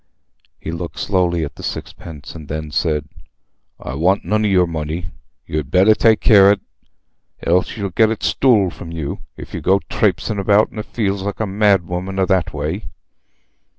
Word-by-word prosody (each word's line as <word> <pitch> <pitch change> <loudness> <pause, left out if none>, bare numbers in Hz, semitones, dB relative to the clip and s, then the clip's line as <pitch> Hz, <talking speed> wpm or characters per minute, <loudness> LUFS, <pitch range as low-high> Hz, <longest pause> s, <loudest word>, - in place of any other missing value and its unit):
He 80 - -5
looked 85 0 -6
slowly 90 -4 +1
at 70 - -8
the - - -9
sixpence, 75 -4 -7
and 80 -3 -10
then 75 0 -5
said, 75 -2 0 0.7
"I 65 - -6
want 90 +7 +1
none 105 +4 +1
o' - - +2
your 90 -2 +4
money. 80 +1 -4 0.3
You'd 75 -3 -3
better 95 +6 +5
take 110 0 +3
care 100 -2 +7
on't, 100 0 +2 0.8
else 90 +6 +1
you'll 100 -2 -3
get 110 +5 +4
it 110 - -4
stool 110 -9 +3
from 85 0 -10
yer, 80 -4 -4 0.2
if - - -10
you - - -4
go 95 +1 +3
trapesin' 105 - 0
about 100 +2 +3
the 110 - -5
fields 100 -3 -2
like 100 +1 -4
a 110 - 0
mad 100 -2 +2
woman 90 +3 -4
a 95 - +3
thatway." 85 0 -1
90 Hz, 175 wpm, -19 LUFS, 80-100 Hz, 0.8 s, care